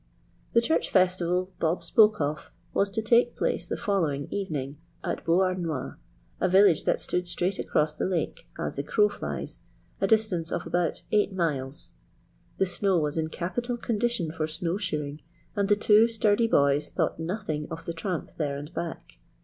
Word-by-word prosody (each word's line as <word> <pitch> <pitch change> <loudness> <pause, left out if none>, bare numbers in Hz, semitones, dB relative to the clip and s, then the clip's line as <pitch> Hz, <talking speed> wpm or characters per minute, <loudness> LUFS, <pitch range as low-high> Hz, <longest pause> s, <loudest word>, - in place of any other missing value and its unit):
The 230 - +5
church 320 +7 +1
festival 185 0 +2
Bob 165 +2 0
spoke 215 -1 +5
of 150 0 -2 0.2
was 200 - +2
to 220 +2 -2
take 235 +2 +4
place - - -1
the - - -3
following 165 -10 0
evening 150 -8 -3 0.3
at - - -3
Beauharnois, 170 -5 0 0.5
a 185 - +2
village 190 -2 +5
that - - +2
stood 180 0 -1
straight 180 +2 -1
across 150 0 0
the - - -1
lake 180 -3 -2
"as - - -4
the - - -1
crow 420 0 +3
flies" - - -5 0.4
a - - +3
distance 210 -7 +2
of - - -2
about 175 -2 -1
eight 210 -1 +3
miles. 145 -6 -2 0.7
The 190 - +3
snow 185 +1 +1
was 150 -2 0
in 160 -1 0
capital 240 +10 -3
condition 230 -7 -1
for 155 -1 -2
snow 170 +3 -2
shoeing, 150 -6 -3 0.3
and 200 -1 0
the 205 - +6
two 215 +2 +5
sturdy 225 0 +2
boys 140 -6 +3
thought - - -1
nothing 160 -3 -3
of 165 -1 -7
the 170 - -3
tramp 170 +1 -4
there 145 -3 -1
and 150 +4 -8
back. 160 - -6
180 Hz, 170 wpm, -27 LUFS, 155-205 Hz, 0.7 s, the